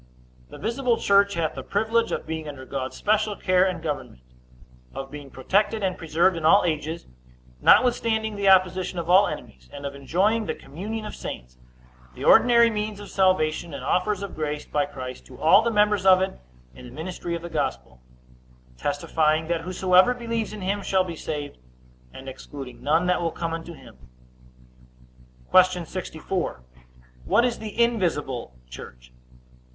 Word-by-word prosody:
The -, -, -11 dB
visible 235 Hz, +1 st, 0 dB
church 200 Hz, 0 st, +3 dB
hath 165 Hz, -2 st, -1 dB
the 135 Hz, -, -6 dB
privilege 225 Hz, -, 0 dB
of -, -, -3 dB
being 160 Hz, -1 st, -5 dB
under 130 Hz, -2 st, -9 dB
God's 130 Hz, -1 st, -5 dB
special 210 Hz, 0 st, +1 dB
care 185 Hz, -2 st, +2 dB
and 175 Hz, -3 st, -4 dB
government; 145 Hz, -, -5 dB, 0.7 s
of 135 Hz, 0 st, -6 dB
being 145 Hz, -2 st, -9 dB
protected 200 Hz, +11 st, 0 dB
and 185 Hz, -1 st, 0 dB
preserved 170 Hz, +3 st, +1 dB
in 165 Hz, -, -5 dB
all 165 Hz, +6 st, +6 dB
ages, 160 Hz, 0 st, -2 dB, 0.6 s
notwithstanding 220 Hz, -3 st, +3 dB
the 200 Hz, -1 st, +2 dB
opposition 185 Hz, -1 st, +3 dB
of 170 Hz, 0 st, -2 dB
all 195 Hz, +3 st, +6 dB
enemies; 65 Hz, 0 st, -8 dB
and 140 Hz, -, -8 dB
of 140 Hz, -, -4 dB
enjoying 190 Hz, +11 st, 0 dB
the -, -, -2 dB
communion 210 Hz, +9 st, -6 dB
of 210 Hz, -, -7 dB
saints, 60 Hz, 0 st, -8 dB, 0.6 s
the -, -, -8 dB
ordinary 235 Hz, -1 st, +6 dB
means 210 Hz, -1 st, -3 dB
of 205 Hz, -, -10 dB
salvation, 170 Hz, -4 st, +1 dB
and -, -, -7 dB
offers 200 Hz, +2 st, 0 dB
of 200 Hz, -, -6 dB
grace 150 Hz, -1 st, -4 dB
by 145 Hz, -1 st, -1 dB
Christ 130 Hz, -3 st, -8 dB
to 125 Hz, -, -14 dB
all 185 Hz, +7 st, +6 dB
the 235 Hz, -, 0 dB
members 210 Hz, -3 st, +2 dB
of 190 Hz, -1 st, +6 dB
it 190 Hz, +1 st, -2 dB, 0.3 s
in 125 Hz, -, -12 dB
the -, -, -12 dB
ministry 170 Hz, +4 st, -5 dB
of 170 Hz, -, -6 dB
the 170 Hz, -, -6 dB
gospel, 60 Hz, 0 st, -3 dB, 0.8 s
testifying, 155 Hz, +2 st, 0 dB
that 170 Hz, -1 st, 0 dB
whosoever 185 Hz, +5 st, +3 dB
believes 230 Hz, -2 st, -3 dB
in 215 Hz, -1 st, -8 dB
him 200 Hz, +2 st, -1 dB
shall 190 Hz, -1 st, +1 dB
be 175 Hz, -2 st, -6 dB
saved, 145 Hz, -, -6 dB, 0.5 s
and 135 Hz, -, -11 dB
excluding 135 Hz, 0 st, -9 dB
none 160 Hz, +4 st, +2 dB
that 180 Hz, -1 st, +1 dB
will 170 Hz, -, 0 dB
come 165 Hz, 0 st, -4 dB
unto 165 Hz, +1 st, -6 dB
him. 110 Hz, -, -15 dB, 1.5 s
Q. 185 Hz, -2 st, +4 dB
64. 175 Hz, -, -4 dB, 0.6 s
What 240 Hz, -, +3 dB
is 245 Hz, -2 st, -1 dB
the 220 Hz, +1 st, -7 dB
invisible 165 Hz, -, 0 dB
church? 60 Hz, 0 st, -12 dB
180 Hz, 165 wpm, -24 LUFS, 150-205 Hz, 1.5 s, all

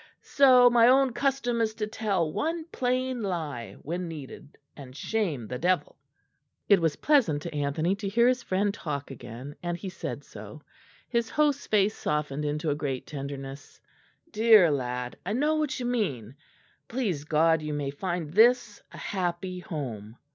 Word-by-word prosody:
So 255 Hz, -3 st, +6 dB
my 240 Hz, -1 st, +6 dB
own 260 Hz, 0 st, +4 dB
custom 255 Hz, -4 st, 0 dB
is 220 Hz, -1 st, 0 dB
to 215 Hz, -, -2 dB
tell 200 Hz, -7 st, -1 dB
one 325 Hz, +1 st, -2 dB
plain 255 Hz, 0 st, -1 dB
lie 155 Hz, -, -4 dB
when 175 Hz, +4 st, -3 dB
needed, 150 Hz, -2 st, -9 dB, 0.2 s
and 130 Hz, -3 st, -11 dB
shame 165 Hz, -, -2 dB
the 125 Hz, +3 st, -5 dB
devil." 180 Hz, +4 st, 0 dB, 0.7 s
It 200 Hz, -4 st, +5 dB
was 160 Hz, -3 st, +1 dB
pleasant 215 Hz, -, +2 dB
to 170 Hz, -, -6 dB
Anthony 150 Hz, +5 st, 0 dB
to 200 Hz, -1 st, -3 dB
hear 235 Hz, +4 st, +4 dB
his 255 Hz, 0 st, +2 dB
friend 200 Hz, +2 st, 0 dB
talk 145 Hz, -7 st, -5 dB
again, 130 Hz, +3 st, -9 dB
and 175 Hz, -1 st, -3 dB
he 190 Hz, -, -6 dB
said 185 Hz, -, -6 dB
so. -, -, -11 dB, 0.4 s
His 235 Hz, -1 st, 0 dB
host's 290 Hz, +2 st, +1 dB
face 210 Hz, 0 st, +2 dB
softened 150 Hz, -1 st, -2 dB
into 150 Hz, +1 st, -1 dB
a -, -, 0 dB
great 140 Hz, -4 st, -3 dB
tenderness. 140 Hz, -1 st, -7 dB, 0.5 s
"Dear 215 Hz, -6 st, +6 dB
lad, 125 Hz, -2 st, -3 dB
I 190 Hz, +5 st, -2 dB
know 295 Hz, +6 st, +2 dB
what 305 Hz, -4 st, -1 dB
you 245 Hz, -, -3 dB
mean. 145 Hz, -, -2 dB, 0.5 s
Please 210 Hz, -, -2 dB
God 160 Hz, +1 st, +3 dB
you 150 Hz, 0 st, -4 dB
may 140 Hz, -2 st, -2 dB
find 170 Hz, 0 st, -4 dB
this 230 Hz, 0 st, +4 dB
a -, -, -11 dB
happy 180 Hz, -1 st, -3 dB
home." 120 Hz, -, -6 dB
180 Hz, 160 wpm, -27 LUFS, 145-230 Hz, 0.7 s, So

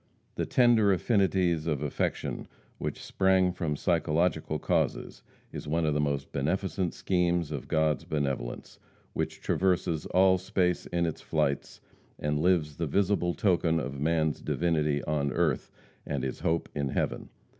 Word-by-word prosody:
The -, -, -2 dB
tender 120 Hz, -5 st, +4 dB
affinities 95 Hz, -5 st, +2 dB
of 75 Hz, -3 st, -1 dB
affection 75 Hz, -, -2 dB, 0.3 s
which -, -, -4 dB
sprang 95 Hz, -1 st, +2 dB
from 85 Hz, -5 st, -2 dB
psychological 80 Hz, 0 st, +1 dB
causes -, -, -1 dB, 0.3 s
is -, -, -6 dB
one 80 Hz, +2 st, +1 dB
of 75 Hz, -, +1 dB
the 75 Hz, -, 0 dB
most 70 Hz, -1 st, -2 dB
beneficent 95 Hz, +5 st, -1 dB
schemes 85 Hz, -3 st, 0 dB
of 70 Hz, -4 st, -5 dB
God's 80 Hz, -2 st, +1 dB
benevolence, 70 Hz, -5 st, -3 dB, 0.3 s
which -, -, -3 dB
traverses 90 Hz, -4 st, 0 dB
all 95 Hz, 0 st, +4 dB
space 90 Hz, -1 st, 0 dB
in 85 Hz, -1 st, 0 dB
its 80 Hz, -, -3 dB
flights, 70 Hz, 0 st, -1 dB, 0.4 s
and 75 Hz, 0 st, -1 dB
lives 80 Hz, -4 st, +2 dB
the 85 Hz, -, -1 dB
visible 95 Hz, +1 st, +1 dB
token 85 Hz, -4 st, +2 dB
of 70 Hz, -2 st, -5 dB
man's 80 Hz, -1 st, +1 dB
divinity 75 Hz, -4 st, 0 dB
on 70 Hz, -2 st, 0 dB
earth 80 Hz, -2 st, 0 dB, 0.3 s
and -, -, -3 dB
his 65 Hz, -, -3 dB
hope 80 Hz, 0 st, 0 dB
in 70 Hz, -1 st, -1 dB
heaven. -, -, -2 dB
80 Hz, 145 wpm, -29 LUFS, 75-90 Hz, 0.4 s, tender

